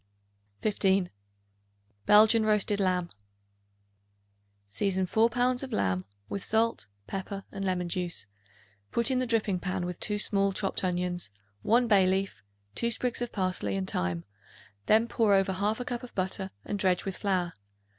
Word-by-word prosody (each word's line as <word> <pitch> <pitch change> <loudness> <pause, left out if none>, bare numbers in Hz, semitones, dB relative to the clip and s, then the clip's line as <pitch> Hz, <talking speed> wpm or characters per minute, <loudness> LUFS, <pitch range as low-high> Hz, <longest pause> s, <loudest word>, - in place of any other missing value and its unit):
15. 195 -3 +2 1.0
Belgian 220 +2 +7
Roast 210 -1 +2
Lamb. 180 -3 0 1.6
Season 190 - 0
4 220 +5 +3
pounds 250 +1 +1
of 270 -1 -6
lamb 95 - 0 0.2
with 200 - -4
salt, 225 - +1 0.2
pepper 195 - -5
and 195 - -5
lemon 180 -2 -1
juice; 175 - -1 0.7
put 235 +2 +1
in 255 - +2
the 255 - -1
dripping 215 -5 +1
pan 185 0 -2
with 180 -1 -5
2 210 -1 -1
small 200 -1 +2
chopped 195 0 -2
onions, 180 - -1 0.3
1 235 - +3
bay 195 -4 +5
leaf, 190 - -1 0.3
2 235 - 0
sprigs 240 +1 -1
of 240 - -2
parsley 185 - -1
and 95 -1 -2
thyme; 90 -1 -1 0.6
then 220 +2 +4
pour 220 -4 +3
over 195 0 +2
1/2 210 +6 -1
cup 240 -1 -3
of 250 - -11
butter 190 0 -2 0.2
and 205 - -3
dredge 185 -2 +2
with 195 -1 -3
flour. 185 -4 0
195 Hz, 150 wpm, -29 LUFS, 180-220 Hz, 1.6 s, Belgian